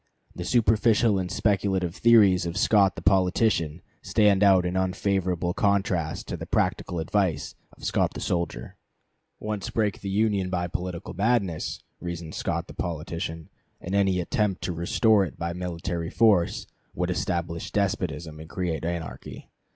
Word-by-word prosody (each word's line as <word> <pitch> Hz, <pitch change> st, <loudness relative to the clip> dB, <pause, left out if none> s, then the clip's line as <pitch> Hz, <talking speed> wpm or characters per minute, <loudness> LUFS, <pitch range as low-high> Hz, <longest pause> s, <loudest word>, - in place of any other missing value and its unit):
The 90 Hz, -, -5 dB
superficial 110 Hz, -2 st, +3 dB
and 90 Hz, -1 st, -3 dB
speculative 95 Hz, -4 st, 0 dB
theories 100 Hz, -7 st, +5 dB
of 85 Hz, -, -4 dB
Scott 100 Hz, -4 st, +4 dB
the 80 Hz, -, -8 dB
politician 90 Hz, -3 st, +2 dB, 0.2 s
stand 105 Hz, -2 st, +3 dB
out 95 Hz, -3 st, +5 dB
in 90 Hz, +1 st, -2 dB
unfavorable 95 Hz, -2 st, 0 dB
contrast 95 Hz, -6 st, 0 dB
to -, -, -2 dB
the -, -, -7 dB
practical 90 Hz, -, 0 dB
advice 85 Hz, -2 st, 0 dB, 0.2 s
of -, -, -18 dB
Scott -, -, 0 dB
the -, -, -5 dB
soldier. 85 Hz, -9 st, -3 dB, 0.6 s
Once 105 Hz, -2 st, -4 dB
break 105 Hz, -3 st, -1 dB
the 100 Hz, -, -4 dB
Union 100 Hz, -2 st, +1 dB
by 90 Hz, -1 st, -1 dB
political 90 Hz, 0 st, -5 dB
madness, 100 Hz, -4 st, 0 dB, 0.2 s
reasons 85 Hz, -2 st, -6 dB
Scott -, -, -2 dB
the -, -, -11 dB
politician, 80 Hz, 0 st, -4 dB, 0.3 s
and 90 Hz, -, -6 dB
any 95 Hz, -2 st, +2 dB
attempt 105 Hz, +1 st, -1 dB
to 90 Hz, -, -2 dB
restore 100 Hz, +5 st, +3 dB
it 90 Hz, -, -6 dB
by 85 Hz, 0 st, -3 dB
military 85 Hz, -1 st, -4 dB
force 105 Hz, -7 st, +3 dB, 0.3 s
would 90 Hz, +1 st, -1 dB
establish 85 Hz, -2 st, -2 dB
despotism 85 Hz, -6 st, -2 dB
and 80 Hz, +1 st, -10 dB
create 85 Hz, -4 st, -3 dB
anarchy. 85 Hz, -1 st, -6 dB
90 Hz, 145 wpm, -26 LUFS, 85-100 Hz, 0.6 s, theories